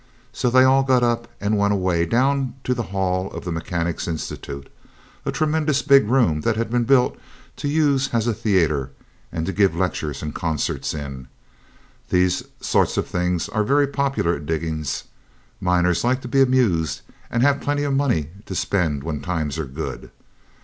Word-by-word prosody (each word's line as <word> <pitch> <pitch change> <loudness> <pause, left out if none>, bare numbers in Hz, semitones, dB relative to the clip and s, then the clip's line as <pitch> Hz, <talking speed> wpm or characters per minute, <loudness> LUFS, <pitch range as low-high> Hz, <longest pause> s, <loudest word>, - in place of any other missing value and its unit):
So 125 - 0
they 130 +1 +6
all 135 +1 +5
got 130 -2 +3
up 120 -1 +1
and 105 +1 0
went 100 0 +3
away 90 -3 +1
down 135 +4 +1
to 125 - +1
the 120 - -2
hall 95 -1 -1
of - - -7
the 90 - -3
Mechanics' 85 0 -2
Institute 70 -4 -5 0.6
a - - +1
tremendous 155 -2 +1
big 140 -6 +5
room 110 - +2
that 110 +7 +1
had 115 0 -2
been 120 -1 +1
built 125 0 +3 0.4
to - - -3
use 145 -3 +2
as 115 -2 +1
a 120 - +1
theatre, 85 - +1 0.4
and 80 -1 -3
to 95 - -2
give 100 -5 +3
lectures 80 -5 -2
and 75 - -4
concerts 80 -1 -2
in. 70 -4 -7 0.8
These 90 0 +2
sort - - +1
of - - +1
things 90 -1 -1
are 105 0 0
very 140 +6 +3
popular 135 - 0
at 75 0 -10
diggings. 80 -3 -2 0.6
Miners 90 -1 +2
like 130 +2 +1
to 125 - -7
be 135 +3 +3
amused, 115 - +2 0.3
and 120 +1 +1
have 140 0 +3
plenty 145 0 0
of 140 -1 0
money 125 - +1 0.2
to 95 - -5
spend 80 -8 0
when 75 -2 -3
times 80 -4 -2
are 80 - -2
good. 70 +5 -6
95 Hz, 175 wpm, -22 LUFS, 80-130 Hz, 0.8 s, they